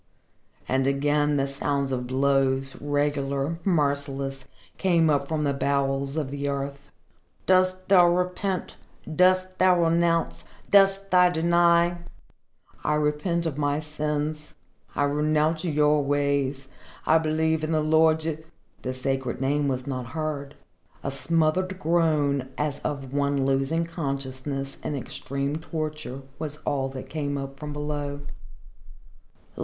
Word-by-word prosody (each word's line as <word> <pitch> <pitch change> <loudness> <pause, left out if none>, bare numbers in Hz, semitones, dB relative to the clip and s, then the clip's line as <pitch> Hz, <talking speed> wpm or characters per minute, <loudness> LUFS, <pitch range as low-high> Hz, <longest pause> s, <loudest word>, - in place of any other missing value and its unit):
And 130 +1 +1
again 145 +1 +2
the 135 - +1
sound 140 0 -2
of 125 -1 -2
blows, 135 0 +2
regular, 145 +1 -1
merciless, 140 -5 -1 0.3
came 170 -4 +3
up 140 -1 +1
from 155 0 -1
the 140 -1 +1
bowels 140 0 0
of 145 -4 -2
the 140 0 -2
earth. 140 0 -4 0.6
"Dost 185 0 +2
thou 180 -3 +7
repent? 180 +1 -1 0.4
Dost 185 +1 +3
thou 180 -2 +5
renounce? 165 0 +1 0.3
Dost 195 0 +4
thou 180 -1 +6
deny?" 170 +1 +3 0.9
"I 150 - +1
repent 150 +3 0
of 150 -3 -3
my 145 0 +1
sins 150 0 -3 0.4
I 145 - +1
renounce 150 +2 +1
your 150 -2 +3
ways 140 -1 0 0.4
I 160 +1 +5
believe 160 0 0
in 155 - -1
the 155 - +2
Lord 160 0 +2 0.2
" - - -36
The 130 - -3
sacred 130 -1 -2
name 140 +2 +1
was 130 -2 -2
not 130 -3 -4
heard. 150 -2 -3 0.5
A 140 - -2
smothered 165 +5 0
groan 155 -6 +1
as 150 -1 -1
of 140 -3 -4
one 140 -1 +1
losing 135 +5 +1
consciousness 135 -3 -4
in 150 - -2
extreme 140 +2 -3
torture 155 -4 -5 0.2
was 150 -2 -4
all 135 -2 0
that 130 -1 -8
came 145 -2 -3
up 135 0 -6
from 150 0 -6
below. 145 -1 -4
145 Hz, 130 wpm, -26 LUFS, 140-160 Hz, 0.9 s, thou